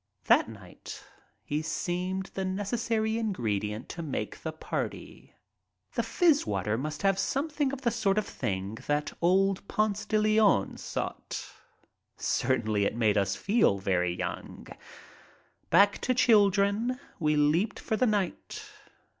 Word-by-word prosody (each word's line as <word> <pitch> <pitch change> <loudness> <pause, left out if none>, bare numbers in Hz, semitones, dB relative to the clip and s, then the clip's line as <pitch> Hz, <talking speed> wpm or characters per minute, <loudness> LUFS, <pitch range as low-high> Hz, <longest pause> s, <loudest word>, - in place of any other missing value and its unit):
That - - +4
night - - -10 0.4
he 150 +6 -2
seemed 180 +4 -3
the 190 - -2
necessary 220 +3 -1
ingredient 110 - -2
to 170 - -6
make 150 -5 -4
the 160 - -3
party. 155 - -6 0.6
The - - +1
fizz 325 -5 +2
water 105 +1 0
must 150 - -4
have 195 -1 +3
something 290 0 0
of 275 -1 -6
the 235 -3 +1
sort 215 -4 +1
of 215 - +1
thing 95 +3 -4
that 145 0 0
old 195 +3 +2
Ponce 210 -1 0
de 215 - +2
Leon 215 - +3
sought. - - -5 0.7
Certainly 105 -2 +1
it - - -1
made 110 -3 +2
us 100 -1 +1
feel 200 - +2
very 90 -3 0
young. - - -6 1.0
Back 200 +4 +5
to 255 - 0
children 210 0 +3 0.2
we 150 -2 +2
leaped 160 +8 +2
for 220 - -2
the 250 +3 +2
night. 205 -5 -2
190 Hz, 135 wpm, -29 LUFS, -, 1.0 s, Back